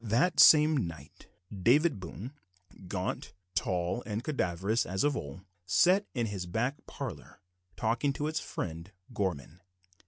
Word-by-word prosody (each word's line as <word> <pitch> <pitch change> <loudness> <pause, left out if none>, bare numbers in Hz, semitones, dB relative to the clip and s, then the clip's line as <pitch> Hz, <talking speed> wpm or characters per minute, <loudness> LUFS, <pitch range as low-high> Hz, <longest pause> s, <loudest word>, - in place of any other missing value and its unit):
That 120 - +1
same 150 - +7
night, 80 -4 -12 0.3
David 130 - +3
Boone, 95 - -8 0.5
gaunt, 90 0 -4 0.2
tall, 90 +5 -1
and 110 +1 -3
cadaverous 100 - 0
as 95 +1 -2
of 145 -1 +2
old, 70 +5 -6 0.3
sat 180 - +4
in 120 -2 0
his 100 -4 -4
back 120 +10 -2
parlour, - - -7 0.4
talking 115 +8 +1
with 155 +2 -1
his - - +2
friend 85 +2 -6 0.2
Gorman. 90 -3 -3
105 Hz, 130 wpm, -30 LUFS, 90-140 Hz, 0.5 s, same